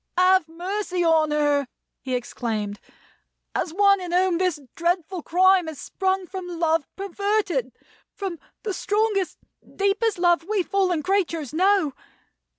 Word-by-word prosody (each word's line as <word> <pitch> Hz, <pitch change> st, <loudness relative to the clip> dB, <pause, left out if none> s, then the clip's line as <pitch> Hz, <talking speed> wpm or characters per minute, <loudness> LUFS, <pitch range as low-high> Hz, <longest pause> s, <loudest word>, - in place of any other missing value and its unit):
"Have 370 Hz, -2 st, +4 dB
mercy 360 Hz, +2 st, -2 dB
on 320 Hz, -2 st, +4 dB
her!" 290 Hz, -2 st, +1 dB, 0.3 s
he 255 Hz, -1 st, -2 dB
exclaimed, 220 Hz, -4 st, -3 dB, 0.7 s
"as 330 Hz, -, -1 dB
one 395 Hz, +2 st, +4 dB
in 355 Hz, -1 st, -5 dB
whom 360 Hz, -1 st, +2 dB
this 365 Hz, -5 st, +1 dB
dreadful 345 Hz, +1 st, -1 dB
crime 370 Hz, +1 st, +4 dB
has 315 Hz, -3 st, -7 dB
sprung 380 Hz, -1 st, -1 dB
from 370 Hz, 0 st, -7 dB
Love 330 Hz, -3 st, 0 dB
perverted; 395 Hz, -, -1 dB, 0.4 s
from 380 Hz, -5 st, -4 dB, 0.2 s
the 415 Hz, -, -2 dB
strongest, 410 Hz, -1 st, 0 dB, 0.4 s
deepest 400 Hz, +2 st, +1 dB
Love 345 Hz, -1 st, +3 dB
we 405 Hz, -1 st, 0 dB
fallen 365 Hz, -5 st, 0 dB
creatures 335 Hz, -7 st, 0 dB
know! 370 Hz, -3 st, +3 dB
360 Hz, 130 wpm, -24 LUFS, 320-390 Hz, 0.7 s, Have